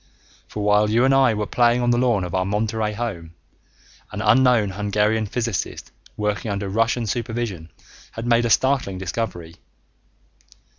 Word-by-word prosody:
For 105 - -5
while 105 +1 +3
you 115 +4 +3
and 135 - +3
I 130 -4 +4
were 105 0 -2
playing 120 +2 +2
on 120 - +2
the 120 - +2
lawn 120 -6 +1
of 90 -1 -6
our 95 -1 +1
Monterey 105 +2 -1
home, 95 -8 -5 0.8
an - - -6
unknown 125 -6 +3
Hungarian 105 +2 0
physicist 115 -2 -4 0.3
working 105 -1 -2
under 100 0 -3
Russian 115 +3 0
supervision 115 -6 -4 0.4
had 115 - -6
made 120 0 +3
a - - 0
startling 130 -6 +1
discovery. 90 -3 -5
110 Hz, 150 wpm, -22 LUFS, 100-120 Hz, 0.8 s, I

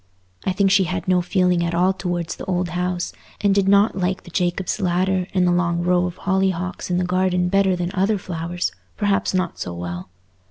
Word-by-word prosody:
I 190 - +2
think 195 +1 +2
she 195 -1 +5
had 185 +2 -3
no 180 -1 +3
feeling 180 -1 +2
at 170 0 -1
all 180 +2 +3
towards 175 -2 -3
the - - -8
old 180 -2 -1
house, 180 0 -2 0.3
and 200 -1 +3
did 195 -1 +2
not 200 +2 +4
like 185 +1 -1
the 175 - -13
Jacobb's 180 +3 -1
Ladder 185 0 +1
and 185 -1 +2
the 175 - +3
long 170 -1 +1
row 180 0 +2
of 180 - -7
hollyhocks 190 -2 -1
in 180 - +1
the 180 - +1
garden 180 0 +1
better 195 -1 +3
than 175 0 -2
other 195 +3 +2
flowers—perhaps 180 +3 -2
not 185 -2 -1
so 90 -1 -4
well. 90 +1 -6
180 Hz, 200 wpm, -22 LUFS, 175-190 Hz, 0.3 s, she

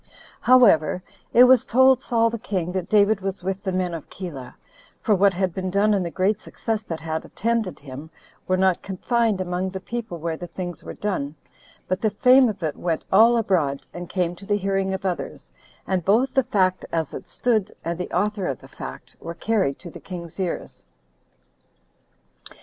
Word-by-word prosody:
However, 200 -9 +5 0.3
it 245 - +8
was 255 -1 +6
told 260 +1 +5
Saul 230 -2 +2
the 230 - -4
king 180 -4 -2
that 185 -1 -3
David 210 -1 +4
was 195 -1 -4
with 190 +1 -2
the 195 - -2
men 180 -1 -1
of 165 - -7
Keilah; 150 -9 -8 0.4
for 215 - +2
what 200 0 +4
had 185 -1 0
been 185 +1 -3
done 200 +3 +3
and 195 -2 +1
the 170 - -3
great 190 +5 +1
success 225 -2 -3
that 165 -7 -6
had 160 0 -3
attended 225 -3 -1
him, 140 +2 -9 0.4
were 185 - +2
not 185 -1 +2
confined 220 +2 0
among 180 0 -2
the 190 0 -6
people 225 -2 -5
where 165 0 -3
the 175 - -7
things 175 -1 -6
were - - -8
done, 160 -8 -3 0.5
but 185 - -1
the 220 - +3
fame 250 +4 +5
of 200 -4 -6
it 155 -2 -1
went 165 -3 -2
all 230 +4 +6
abroad, 170 -11 0
and 175 0 -7
came 180 -2 -1
to 195 - -11
the 205 - +2
hearing 195 -1 0
of 190 0 -4
others, 180 -2 -4 0.3
and 185 -2 -1
both 240 +9 +3
the 265 - +4
fact 185 -2 +1
as 160 -3 -2
it - - -7
stood, 215 -5 0
and 170 +1 -2
the 180 - -3
author 205 0 0
of 135 - -3
the - - -14
fact, - - -9
were 170 - -7
carried 195 -9 0
to 170 - -10
the - - -10
king's 170 -1 -8
ears. 180 -3 -4
190 Hz, 195 wpm, -23 LUFS, 175-215 Hz, 0.5 s, it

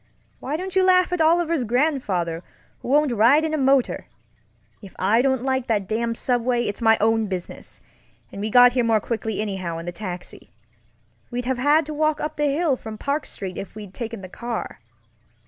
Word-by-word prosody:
Why 285 +4 -3
don't 375 +2 -6
you 380 - +4
laugh 365 -1 +4
at 360 - 0
Oliver's 330 -2 +2
grandfather, 215 - 0 0.4
who - - -10
won't 290 +1 +3
ride 245 +8 +4
in 315 - -2
a - - +2
motor? 270 -1 +2 0.7
If 195 -3 -13
I 210 +5 +3
don't 265 -2 +1
like 260 -1 -1
that 210 -5 0
damned 230 +2 -1
subway, 245 -1 0
it's 205 +1 -4
my 225 -1 +5
own 225 0 +2
business; 185 -3 -7 0.5
and 200 - -7
we 215 - -2
got 245 +2 +7
here 250 -1 +1
more 225 -2 +3
quickly 220 -1 -3
anyhow 190 -5 -4
in 165 - -7
the 175 - -4
taxi. 180 -1 -8 0.8
We'd 245 0 -4
have 260 -1 -1
had 295 +4 +3
to 305 - -6
walk 310 0 +1
up 300 - -4
the 295 -1 +1
hill 300 -1 +1
from 220 -2 -8
Park 285 +5 -2
Street 185 -2 -6
if 200 - -8
we'd 205 -3 -9
taken 230 -2 -6
the 185 - -8
car. 235 +4 -6
240 Hz, 195 wpm, -23 LUFS, 210-290 Hz, 0.8 s, got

